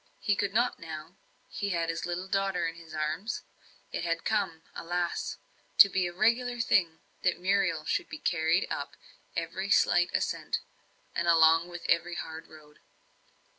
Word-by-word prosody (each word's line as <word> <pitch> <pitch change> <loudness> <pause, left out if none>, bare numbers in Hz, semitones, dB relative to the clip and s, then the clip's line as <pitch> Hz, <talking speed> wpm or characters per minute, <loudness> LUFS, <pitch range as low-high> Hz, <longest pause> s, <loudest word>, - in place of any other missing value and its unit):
He 205 - +1
could 200 0 0
not 240 +4 +1
now; 160 +2 -8 0.3
he 200 - -3
had 170 -3 0
his 165 +1 -3
little 180 +2 -3
daughter 195 -3 0
in 165 - -4
his 165 -1 -14
arms. 155 +8 -2 0.5
It - - -3
had 165 -1 -1
come, 195 -7 0
alas! 175 0 -2 0.4
to 200 - +10
be 185 -1 +1
a - - -5
regular 235 +6 +1
thing 175 -8 +2 0.2
that 180 - +1
Muriel 185 -4 +1
should 340 - -1
be - - -6
carried 170 - +1
up - - -4 0.4
every - - -3
slight - - +4
ascent, - - -1 0.5
and 170 - -1
along 165 +1 +5 0.2
every 170 +1 +2
hard 160 -1 -6
road. 150 -1 -16
175 Hz, 155 wpm, -29 LUFS, 165-195 Hz, 0.5 s, to